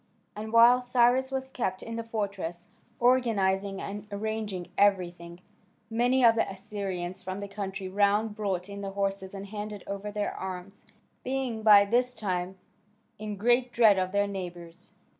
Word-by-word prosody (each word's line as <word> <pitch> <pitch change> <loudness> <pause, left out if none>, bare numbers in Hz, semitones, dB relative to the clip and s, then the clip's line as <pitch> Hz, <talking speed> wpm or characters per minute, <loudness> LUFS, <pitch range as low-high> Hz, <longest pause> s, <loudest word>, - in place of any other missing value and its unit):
And 215 +1 -6
while 235 +2 +7
Cyrus 250 +1 +3
was 265 0 -3
kept 190 -8 -3
in 230 - -6
the 230 - -3
fortress, 200 -6 -4 0.3
organising 200 -6 +2
and 205 +1 -6
arranging 210 -3 -4
everything, 175 -3 +1 0.5
many 245 +3 +3
of 230 - +7
the 225 - 0
Assyrians 190 -2 -5
from 185 +1 -5
the 200 - -5
country 195 -1 -5
round 205 +3 +2
brought 195 -4 -2
in 200 0 -7
their 195 - -4
horses 195 -1 -2
and 195 0 -6
handed 210 0 -6
over 200 +1 -5
their 205 0 -2
arms, 190 +1 -7 0.4
being 255 -3 -2
by 205 -2 +8
this 250 +4 +1
time 190 -3 -3 0.6
in 210 -1 -5
great 245 +4 +2
dread 220 -5 +5
of 185 0 -1
their 200 +1 +2
neighbours. 175 -4 -8
205 Hz, 155 wpm, -28 LUFS, 190-225 Hz, 0.6 s, by